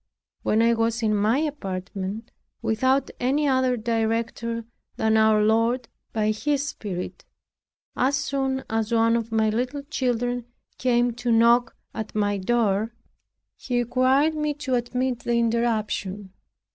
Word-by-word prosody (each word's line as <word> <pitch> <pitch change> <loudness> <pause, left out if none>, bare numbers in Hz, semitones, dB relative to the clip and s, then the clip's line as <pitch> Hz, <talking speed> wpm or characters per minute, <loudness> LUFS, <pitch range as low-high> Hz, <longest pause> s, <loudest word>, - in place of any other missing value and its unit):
When 220 +2 +2
I 235 0 +4
was 230 0 0
in 215 -1 +2
my 215 +4 +2
apartment, 200 -6 -4 0.3
without 260 +5 +1
any 280 +4 +1
other 260 -2 +2
director 230 0 -1 0.3
than 220 0 +2
our 220 -1 +4
Lord 230 +3 +2 0.2
by 215 -1 +1
His 285 +6 0
Spirit, 185 -9 -5 0.7
as 265 +3 +2
soon 270 -1 -1
as 225 0 -1
one 230 0 +3
of 230 -1 -2
my 220 -1 +2
little 250 +5 -2
children 245 -4 -1 0.3
came 245 -1 +2
to 240 0 -1
knock 235 +1 +4 0.2
at 220 -1 -6
my 205 -1 +1
door, 220 +1 +1 0.6
he 245 -2 -3
required 255 +5 +3
me 300 -1 -1
to 290 -3 -3
admit 250 0 0
the 240 - -1
interruption. 215 -4 -1
235 Hz, 135 wpm, -24 LUFS, 220-255 Hz, 0.7 s, I